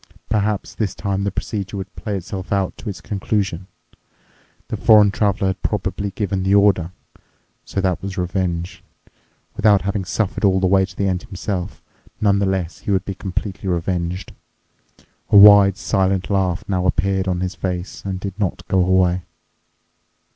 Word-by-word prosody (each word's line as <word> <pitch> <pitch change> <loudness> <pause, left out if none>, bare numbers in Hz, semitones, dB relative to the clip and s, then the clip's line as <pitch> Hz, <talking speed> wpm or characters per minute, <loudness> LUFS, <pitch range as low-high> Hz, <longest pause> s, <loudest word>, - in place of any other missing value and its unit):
Perhaps 105 -1 -1
this 105 -5 -2
time 100 -1 -2
the 100 - 0
procedure 100 0 -4
would 95 - -7
play 105 -3 -3
itself 95 +1 -7
out 100 -2 0
to 110 - -7
its 95 - -7
conclusion. 95 -3 -2 1.0
The - - -2
foreign 105 -2 +6
Traveler 100 -2 +1
had 95 - -4
probably 100 -1 -2
given 100 -1 -2
the 95 +2 +2
order. 100 -4 +3 0.7
So 95 - -2
that 90 -2 0
was 100 0 -6
revenge. 90 0 -2 0.7
Without 105 -3 +4
having 100 0 -1
suffered 105 +2 -2
all 95 -2 +4
the 95 - +1
way 95 +1 +4
to 95 0 -14
the 100 - 0
end 90 -1 -1
himself, 95 0 -5 0.4
nonetheless 95 -4 0
he - - -8
would 95 -2 +1
be 100 - -3
completely 95 0 -4
revenged. 85 +1 -2 1.0
A - - +6
wide, 100 -1 +8
silent 95 -4 0
laugh 95 -3 0
now 95 -2 0
appeared 95 0 0
on 90 -1 -1
his 95 0 -2
face 90 0 -5
and 95 -2 -4
did 100 0 -5
not 100 -4 -2
go 95 -1 +2
away. 90 0 +2
95 Hz, 160 wpm, -20 LUFS, 90-100 Hz, 1.0 s, wide